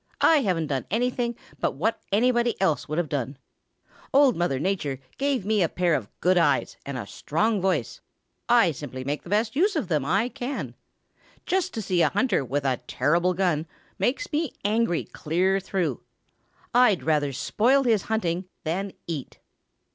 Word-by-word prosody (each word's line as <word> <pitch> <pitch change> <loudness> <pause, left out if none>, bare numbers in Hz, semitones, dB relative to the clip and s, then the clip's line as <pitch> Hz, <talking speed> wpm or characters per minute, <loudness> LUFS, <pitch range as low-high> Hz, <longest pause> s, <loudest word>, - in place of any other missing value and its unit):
"I 325 - +6
haven't 185 - +1
done 135 -3 -3
anything 240 +2 0 0.2
but - - 0
what 215 +11 -1
anybody 240 +2 +2
else 160 -6 +1
would 155 - -2
have 175 -2 0
done. 135 -1 -3 0.7
Old 275 -3 +5
Mother 175 -6 0
Nature 150 -6 -1 0.2
gave 270 -7 0
me 215 -1 +2
a 170 - +2
pair 175 -2 +1
of 115 -9 -1
good 180 0 +4
eyes 165 -4 +2
and 140 -2 -4
a 115 - -5
strong 205 - -1
voice. 190 0 -1 0.5
I 235 -8 +5
simply 130 -2 -7
make 145 +3 -2
the - - -12
best 215 +3 +1
use 390 +7 +2
of 275 - -1
them 150 -5 +1
I 195 - +1
can. 270 +1 -5 0.7
Just 375 +1 0
to 220 - -3
see 180 -2 +1
a 155 - +4
hunter 205 - +1
with 140 +3 -2
a 130 -2 +2
terrible 170 +7 +1
gun 170 -4 0 0.3
makes 310 +11 0
me 305 -2 -1
angry 210 -5 +1
clear 185 +5 0
through. 180 - -2 0.7
I'd 245 -7 +4
rather 150 -3 +1
spoil 250 - +2
his 225 -5 +3
hunting 185 -5 0 0.2
than 185 +5 -2
eat." 155 -6 -5
185 Hz, 170 wpm, -25 LUFS, 155-235 Hz, 0.7 s, I